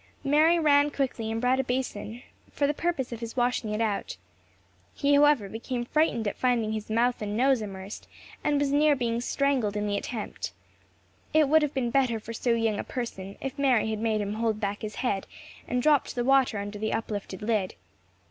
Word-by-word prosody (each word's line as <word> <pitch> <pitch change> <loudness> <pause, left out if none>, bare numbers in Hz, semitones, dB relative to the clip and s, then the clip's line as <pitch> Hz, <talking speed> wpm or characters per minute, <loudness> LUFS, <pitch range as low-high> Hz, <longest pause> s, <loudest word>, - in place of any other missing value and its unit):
Mary 305 +4 +4
ran 290 -2 +4
quickly 255 -6 -2
and 225 - -2
brought 250 +2 +2
a - - +2
basin, 245 -2 -3 0.3
for 285 - 0
the 290 - +1
purpose 315 -6 -2
of 235 - -5
his 230 +1 -7
washing 245 -3 0
it 210 - -2
out. 205 - -2 0.8
He 285 0 +2
however 285 -7 +5
became 240 +4 -4
frightened 240 -6 +1
at - - -2
finding 240 -4 +1
his 215 -1 -4
mouth 235 +2 +1
and 210 0 -3
nose 260 -1 +3
immersed, 195 -1 -7 0.4
and 290 -1 +2
was 285 -1 +1
near 295 +1 +4
being 235 -2 -1
strangled 250 -6 0
in 210 - -1
the 205 -1 0
attempt. 220 +1 -5 0.8
It 310 -2 +5
would 315 +3 +5
have 295 -2 -1
been 245 -3 0
better 250 -3 +2
for 230 +2 -8
so 235 +1 0
young 225 -2 0
a - - -2
person, 200 -6 -6
if 275 +1 -5
Mary 250 -6 +3
had 215 - -3
made 220 -1 0
him 205 0 -3
hold 220 -1 -1
back 205 -1 -3
his 215 0 -5
head, 195 -5 -1 0.4
and 250 0 -1
dropped 300 -2 +3
the 240 - 0
water 265 -4 +3
under 205 +1 -5
the 220 +1 -1
uplifted 205 -3 -4
lid. 210 -4 0
240 Hz, 200 wpm, -27 LUFS, 215-275 Hz, 0.8 s, however